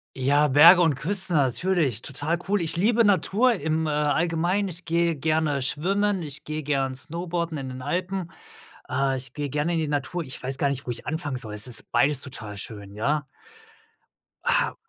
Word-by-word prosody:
Ja, 140 +3 +3
Berge 165 +6 +8
und 160 -4 +3
Küste 185 +6 -3
natürlich, 145 - +1
total 145 +6 -2
cool. 205 0 +1
Ich 165 0 -2
liebe 225 +6 +3
Natur 205 +5 +3
im, 160 -4 -1
äh, 155 - -1
Allgemeinen. 165 +6 +1
Ich 175 -1 -8
gehe 170 0 +1
gerne 155 -1 0
schwimmen, 190 +8 0
ich 145 -2 -5
gehe 155 0 -4
gern 135 -2 0
Snowboarden 170 +2 -3
in 135 -1 -5
den 130 0 -7
Alpen. 180 +1 -2 0.6
Äh, 135 -1 0
ich 130 -1 -8
gehe 145 -1 -3
gerne 150 +5 -1
in 165 - +1
die 155 - -1
Natur. 145 +4 -2
Ich 130 -3 -6
weiß 135 +1 -2
gar 140 - +2
nicht, 140 0 -4
wo 125 - -2
ich 120 - -8
anfangen 150 -4 -2
soll, 110 -4 -5
es 105 - 0
ist 125 -2 -3
beides 135 +3 +3
total 115 -6 -7
schön, 100 -1 -7
ja? 145 +8 0 1.2
Ha - - +1
150 Hz, 185 wpm, -25 LUFS, 135-175 Hz, 1.2 s, Berge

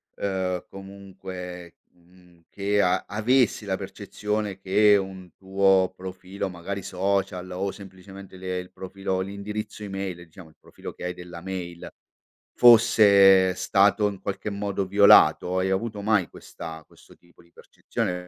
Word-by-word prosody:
uhm, 95 -2 -3
comunque, 95 -3 -10 0.2
mhmm, 90 -1 -24
che 100 +1 0
a 90 - +1
avessi 110 +1 +1
la 95 -1 -2
percezione 105 +1 -4
che 100 +2 +4
un 95 -2 -6
tuo 95 -1 +2
profilo 95 +1 -6
magari 95 +3 -6
social 95 -1 -2
o 95 +2 -3
semplicemente 95 -1 -13
le 90 0 -4
il 90 0 -7
profilo, 95 0 -4
l'indirizzo 105 +3 -6
email, 95 -2 -5
diciamo, 85 0 -15
il 80 - -24
profilo - - -10
che - - -12
hai 90 - -3
della 90 -1 -10
mail 90 -2 -7 0.7
fosse 100 -5 +6
stato 100 +2 +2
in 100 -2 -6
qualche 100 +2 -4
modo 100 -1 -3
violato? 95 -2 +5
Hai 95 +1 0
avuto 105 +1 -2
mai 105 -4 +1
questa 80 -1 -10
questo - - -20
tipo 85 0 -24
di 85 0 -26
percezione? 90 0 -5
95 Hz, 140 wpm, -25 LUFS, 90-100 Hz, 0.7 s, fosse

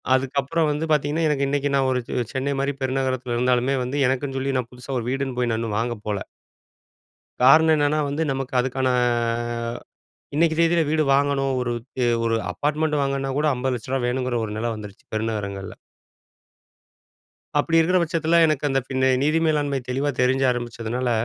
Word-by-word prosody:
அதுக்கப்றம் 140 +4 0
வந்து 150 +2 -2
பாத்தீங்கனா, 150 +2 +1
எனக்கு 140 -2 +1
இன்னைக்கு 145 0 0
நான் 135 -1 +2
ஒரு 125 - +1
ச் - - -4 0.2
சென்னை 135 +2 -1
மாரி 140 +1 0
பெருநகரத்துல 130 -2 -1
இருந்தாலுமே 125 +2 +2
வந்து, 135 +3 -3
எனக்குன்னு 135 +1 -1
சொல்லி 135 0 -1
நான் 120 -2 -5
புதுசா 125 +1 -5
ஒரு 115 - -5
வீடுன்னு 135 -2 -2
போய் 120 -1 +1
நான் 110 0 -1
இன்னு 110 -2 -2
வாங்க 120 +1 -1
போல. 105 -2 -1 1.2
காரணம் 155 +4 +7
என்னனா? 145 +1 +2
வந்து 150 +3 -1
நமக்கு 135 -1 -4
அதுக்கான 130 +1 0 1.5
இன்னைக்கி 160 0 +3
தேதில 170 0 +4
வீடு 155 0 +2
வாங்கணும், 135 -1 +1
ஒரு 120 - -1 0.3
தே 125 - +1 0.2
ஒரு 115 0 +1 0.2
அப்பார்ட்மெண்ட் 150 0 0
வாங்கன்னா 135 0 -1
கூட 155 - +2
ரூ.50,00,00 130 0 -2
வேணுங்ற 125 0 -1
ஒரு 105 - -6
நில 115 +2 -2
வந்துருச்சு 105 -2 -10
பெருநகரங்கள்ல. 105 -3 -3 1.9
அப்டி 165 +3 +2
இருக்குற 180 +3 +3
பச்சத்துல 165 0 +2
எனக்கு 150 -2 0
அந்த 135 0 +2
ஃபின 130 -1 0 0.2
நிதி 155 +3 +2
மேலாண்மை 145 -3 +1
தெளிவா 135 +3 -1
தெரிஞ்ச 130 +2 +2
ஆரம்பிச்சததுனால, 120 0 -2
135 Hz, 160 wpm, -23 LUFS, 125-145 Hz, 1.9 s, காரணம்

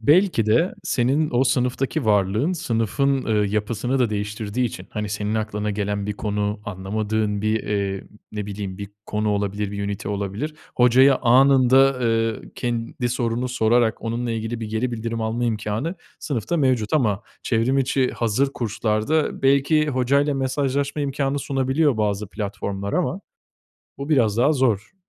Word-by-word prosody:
Belki 150 - +3
de, 165 - +2
senin 140 +4 +1
o 125 +2 +3
sınıftaki 130 +3 0
varlığın 105 - +2
sınıfın, 135 - 0
eee, 105 -2 +2
yapısını 110 +5 -1
da 120 -4 +2
değiştirdiği 105 +3 -2
için, 115 - -8
hani, 105 -1 -3
senin 105 +1 -2
aklına 105 -1 -2
gelen 100 0 -2
bir 105 - -1
konu, 105 0 -2
anlamadığın 105 +1 -2
bir, 110 0 +1
eee, 100 -2 -2 0.3
ne 105 -1 -4
bileyim, 100 -2 -5
bir 100 -1 -6 0.2
konu 105 0 -1
olabilir, 100 0 -1
bir 100 0 -4
ünite 100 +1 -4
olabilir. 100 +9 -3 0.2
Hocaya 130 +2 +5
anında, 130 +1 +5
eee, 115 -2 0
kendi 120 0 -2
sorunu 120 +1 -1
sorarak 115 -1 +2
onunla 120 +1 -2
ilgili 115 +1 -3
bir 110 - -3
geri 115 +3 -1
bildirim 115 0 -3
alma 110 +2 -1
imkânı, 110 - -2 0.2
sınıfta 140 +5 -2
mevcut 130 -8 +1
ama 110 -10 +1 0.2
çevrim 120 +3 +1
içi 135 -1 +1
hazır 120 +5 0
kurslarda 115 +6 -1
belki 140 +3 +3
hocayla 140 +2 +2
mesajlaşma 140 +2 -1
imkânı 140 0 -1
sunabiliyor, 135 0 +1
bazı 105 -1 -1
platformlar 100 -1 -4
ama - - 0 0.8
bu 140 +3 -6
biraz 115 -7 +3
daha 130 +5 +4
zor. 120 - 0
115 Hz, 145 wpm, -23 LUFS, 105-135 Hz, 0.8 s, Hocaya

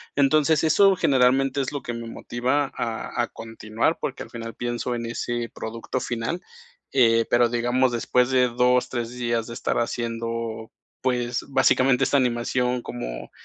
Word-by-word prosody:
Entonces, 150 +2 +3
eso 195 +4 +5
generalmente 135 -1 +3
es 130 - -3
lo 145 - -3
que 120 - -4
me 115 0 -6
motiva 130 +5 -1
a 115 +1 -2
a - - -2
continuar, 115 +5 -2
porque 135 - -3
al - - -13
final 115 -1 -6
pienso 120 0 -2
en 115 0 -4
ese 120 0 -3
producto 115 +3 -4
final. 120 +9 -3 0.6
Eh, 115 -2 +5
pero 120 -1 +4
digamos, 120 +2 +1
después 125 +2 +1
de 125 -1 +4
2 125 +1 +2
3 120 -2 -3
días 120 -2 -2
de 115 - -7
estar - - -2
haciendo, 115 -1 -3 0.3
pues, 125 -2 -1
básicamente 130 -1 +3
esta - - 0
animación 125 0 0
como - - -6
120 Hz, 155 wpm, -24 LUFS, 115-130 Hz, 0.6 s, eso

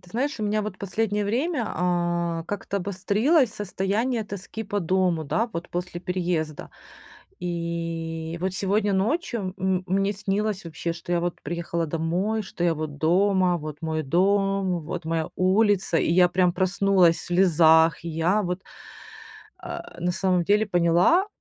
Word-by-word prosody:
Ты 180 - -19
знаешь, 265 +4 -2
у - - -2
меня 210 +1 0
вот 205 -3 -6
последнее 205 +1 -1
время, 255 - 0
а, 175 -1 -1
как-то 200 0 -3
обострилось 205 - +2
состояние 210 +4 -1
тоски 205 +2 -6
по 205 +1 -2
дому, 180 -2 +1
да, 225 +11 0
вот 170 +1 -5
после 175 0 -4
переезда. 175 -4 -2 0.7
И 165 -1 -4
вот 185 +1 -1
сегодня 200 +2 +1
ночью, 215 - -1
м 190 0 0
мне 195 +2 +1
снилось 205 0 -2
вообще, 165 +1 -4
что 170 +1 -6
я 175 - +2
вот 175 0 -3
приехала 170 -1 -3
домой, 175 +8 -1
что 190 -3 -4
я 170 -1 +3
вот 155 -2 -5
дома, 185 +2 +3
вот 150 -1 -7
мой 160 -1 -1
дом, 195 +3 +1
вот 170 +2 -5
моя 165 -1 -1
улица, 195 -1 +2
и - - +1
я 180 +1 +5
прям 180 0 +2
проснулась 185 -2 +3
в - - -8
слезах. 165 -3 +4
Я 170 +5 +1
вот, 180 -1 -3 1.0
э, - - -5 0.2
на 175 +1 0
самом 185 -1 +1
деле 210 +4 +3
поняла, 175 - +3
185 Hz, 150 wpm, -25 LUFS, 170-200 Hz, 1.0 s, я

